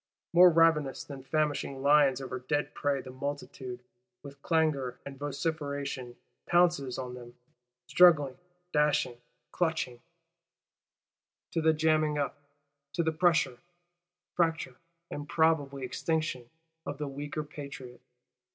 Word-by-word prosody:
More 180 Hz, +1 st, +9 dB
ravenous 160 Hz, -5 st, +3 dB
than 140 Hz, -2 st, -9 dB
famishing 140 Hz, -1 st, -1 dB
lions 140 Hz, -2 st, +5 dB
over 130 Hz, -1 st, -5 dB
dead 145 Hz, +4 st, -2 dB
prey, 140 Hz, -2 st, 0 dB
the 130 Hz, -, -10 dB
multitude, 130 Hz, -2 st, -6 dB, 0.4 s
with 140 Hz, -1 st, -11 dB
clangour 155 Hz, -7 st, +1 dB
and 140 Hz, -1 st, -7 dB
vociferation, 140 Hz, -3 st, -3 dB, 0.3 s
pounces 175 Hz, -7 st, +2 dB
on 125 Hz, -1 st, -5 dB
them; 120 Hz, -1 st, -11 dB, 0.5 s
struggling, 155 Hz, -7 st, +5 dB, 0.4 s
dashing, 145 Hz, -5 st, +1 dB, 0.3 s
clutching:—to 160 Hz, -8 st, -1 dB, 1.6 s
the 160 Hz, 0 st, +4 dB
jamming 155 Hz, -1 st, +2 dB
up, 145 Hz, -1 st, -1 dB, 0.6 s
to 170 Hz, -, +1 dB
the 160 Hz, -, +1 dB
pressure, 160 Hz, -6 st, +2 dB, 0.7 s
fracture 165 Hz, -7 st, 0 dB, 0.3 s
and 145 Hz, 0 st, -6 dB
probable 160 Hz, -4 st, +2 dB
extinction, 130 Hz, -1 st, -2 dB, 0.3 s
of 145 Hz, -, -5 dB
the 150 Hz, 0 st, -3 dB
weaker 145 Hz, +2 st, -4 dB
Patriot. 140 Hz, -4 st, -9 dB
145 Hz, 110 wpm, -30 LUFS, 130-160 Hz, 1.6 s, More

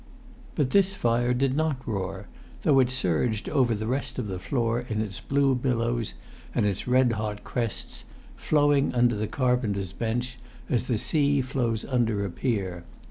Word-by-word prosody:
But 135 Hz, -3 st, +1 dB
this 195 Hz, -1 st, +4 dB
fire 120 Hz, -7 st, +1 dB
did 130 Hz, +1 st, +1 dB
not 150 Hz, -4 st, -1 dB
roar, 95 Hz, -2 st, -3 dB, 0.4 s
though 140 Hz, -3 st, +5 dB
it 125 Hz, -2 st, +4 dB
surged 110 Hz, -2 st, 0 dB
over 120 Hz, -4 st, +2 dB
the 110 Hz, +1 st, -4 dB
rest 130 Hz, +4 st, -2 dB
of 125 Hz, -, -2 dB
the 95 Hz, -3 st, -4 dB
floor 115 Hz, +2 st, 0 dB
in 110 Hz, -1 st, -1 dB
its 105 Hz, -4 st, -3 dB
blue 140 Hz, -1 st, +2 dB
billows 120 Hz, -, -1 dB, 0.4 s
and -, -, +2 dB
its 100 Hz, +1 st, -2 dB
red 125 Hz, 0 st, +4 dB
hot 105 Hz, -2 st, -3 dB
crests, 115 Hz, -4 st, -3 dB, 0.3 s
flowing 145 Hz, -3 st, +2 dB
under 120 Hz, -1 st, +3 dB
the 105 Hz, +1 st, -2 dB
carpenter's 110 Hz, -5 st, 0 dB
bench 120 Hz, +3 st, -2 dB, 0.3 s
as 125 Hz, 0 st, 0 dB
the 120 Hz, -, +1 dB
sea 145 Hz, +4 st, +2 dB
flows 125 Hz, -4 st, -1 dB
under 115 Hz, -6 st, +1 dB
a 95 Hz, -, -4 dB
pier. 95 Hz, -6 st, -2 dB
120 Hz, 165 wpm, -26 LUFS, 105-130 Hz, 0.4 s, though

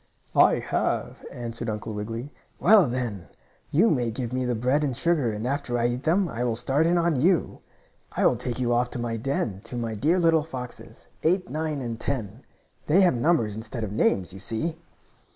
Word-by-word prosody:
"I -, -, +6 dB
have," -, -, -2 dB
answered 120 Hz, -1 st, -5 dB
Uncle 110 Hz, +1 st, -4 dB
Wiggily. 115 Hz, +6 st, -5 dB, 0.3 s
"Well, 200 Hz, -4 st, +6 dB
then, 120 Hz, -7 st, -3 dB, 0.4 s
you 190 Hz, +10 st, +4 dB
may 125 Hz, -6 st, +1 dB
give 120 Hz, +1 st, -4 dB
me 130 Hz, 0 st, 0 dB
the 125 Hz, -1 st, 0 dB
bread 130 Hz, +6 st, +1 dB
and 135 Hz, -5 st, -1 dB
sugar 155 Hz, -9 st, +1 dB
and 105 Hz, +2 st, -4 dB
after 135 Hz, -2 st, -1 dB
I 120 Hz, 0 st, +2 dB
eat 120 Hz, +1 st, -3 dB
them 175 Hz, +6 st, +2 dB
I 120 Hz, -6 st, -3 dB
will 120 Hz, -2 st, 0 dB
start 135 Hz, +7 st, +1 dB
in 175 Hz, +1 st, +3 dB
on 170 Hz, -6 st, +2 dB
you. 175 Hz, +2 st, +2 dB, 0.5 s
I -, -, 0 dB
will -, -, +5 dB
take 125 Hz, +1 st, -4 dB
you 120 Hz, -1 st, +1 dB
off 120 Hz, +1 st, +1 dB
to -, -, -5 dB
my 120 Hz, -1 st, -2 dB
den, 110 Hz, -5 st, -2 dB
to 120 Hz, -, -5 dB
my 115 Hz, -2 st, -2 dB
dear 150 Hz, -, +2 dB
little 165 Hz, -2 st, +4 dB
foxes. 130 Hz, -6 st, -8 dB
Eight, 180 Hz, -1 st, +1 dB
Nine 155 Hz, -1 st, -2 dB
and 115 Hz, -2 st, -4 dB
Ten. 115 Hz, -3 st, -3 dB, 0.5 s
They 175 Hz, +6 st, +5 dB
have 180 Hz, -5 st, +5 dB
numbers 120 Hz, -5 st, +1 dB
instead 110 Hz, +1 st, -5 dB
of 105 Hz, -, -4 dB
names, 95 Hz, -3 st, +1 dB
you 95 Hz, -, -9 dB
see." 115 Hz, -, -2 dB
125 Hz, 200 wpm, -26 LUFS, 115-155 Hz, 0.5 s, I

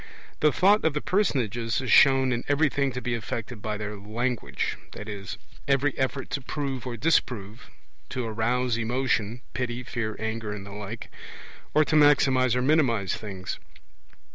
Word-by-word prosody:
The 150 Hz, -, +4 dB
Thought 200 Hz, +7 st, +4 dB
of 160 Hz, -2 st, +2 dB
the -, -, +2 dB
personages 120 Hz, -, 0 dB
is 130 Hz, -2 st, -2 dB
shown 135 Hz, -1 st, +6 dB
in 120 Hz, 0 st, -1 dB
everything 145 Hz, -1 st, +2 dB
to 125 Hz, -, -4 dB
be 125 Hz, -, -1 dB
effected 115 Hz, 0 st, -4 dB
by 105 Hz, 0 st, -3 dB
their 105 Hz, 0 st, -4 dB
language 115 Hz, +4 st, -2 dB, 0.2 s
in 105 Hz, -2 st, -6 dB, 0.4 s
every 140 Hz, 0 st, +2 dB
effort 130 Hz, +1 st, -2 dB
to 140 Hz, -, -1 dB
prove 135 Hz, -2 st, -4 dB
or 120 Hz, -1 st, -4 dB
disprove, 115 Hz, -6 st, 0 dB, 0.4 s
to 125 Hz, -, -3 dB
arouse 115 Hz, +2 st, 0 dB
emotion 120 Hz, -1 st, 0 dB
(pity, 125 Hz, -1 st, -3 dB
fear, 115 Hz, -3 st, -3 dB
anger, 110 Hz, -1 st, -3 dB
and 100 Hz, -2 st, -7 dB
the 100 Hz, -, -9 dB
like), 105 Hz, +2 st, -7 dB, 0.6 s
or 155 Hz, 0 st, +6 dB
to 155 Hz, -, 0 dB
maximize 135 Hz, -4 st, +5 dB
or 125 Hz, -, +1 dB
minimize 130 Hz, -9 st, +2 dB
things. 95 Hz, -4 st, -6 dB
125 Hz, 155 wpm, -26 LUFS, 110-135 Hz, 0.6 s, shown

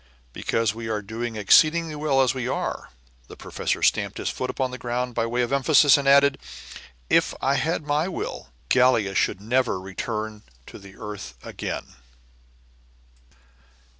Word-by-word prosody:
"Because 115 Hz, -, -1 dB
we 115 Hz, 0 st, -6 dB
are 105 Hz, -1 st, -2 dB
doing 115 Hz, +2 st, -5 dB
exceedingly 155 Hz, -, +4 dB
well 145 Hz, -3 st, +2 dB
as 130 Hz, -, +1 dB
we 125 Hz, -2 st, -4 dB
are." -, -, -3 dB, 0.4 s
The -, -, -12 dB
professor -, -, -3 dB
stamped -, -, +1 dB
his -, -, -2 dB
foot -, -, -4 dB
upon 130 Hz, -1 st, -2 dB
the 130 Hz, -, -7 dB
ground, 125 Hz, +1 st, -3 dB
by 115 Hz, 0 st, -1 dB
way 120 Hz, +1 st, 0 dB
of 120 Hz, -, -2 dB
emphasis, 140 Hz, 0 st, +5 dB
and 140 Hz, -1 st, -1 dB
added, 140 Hz, 0 st, +5 dB, 0.7 s
"If -, -, +2 dB
I 135 Hz, -, +1 dB
had 155 Hz, +2 st, -1 dB
my 150 Hz, +3 st, 0 dB
will, 190 Hz, -, -5 dB, 0.2 s
Gallia 125 Hz, -6 st, +3 dB
should 95 Hz, -, 0 dB
never 120 Hz, 0 st, 0 dB
return 105 Hz, +3 st, -5 dB, 0.2 s
to -, -, -11 dB
the 100 Hz, -1 st, -14 dB
earth 105 Hz, -1 st, -8 dB
again!" -, -, -6 dB
125 Hz, 155 wpm, -24 LUFS, 110-140 Hz, 0.7 s, emphasis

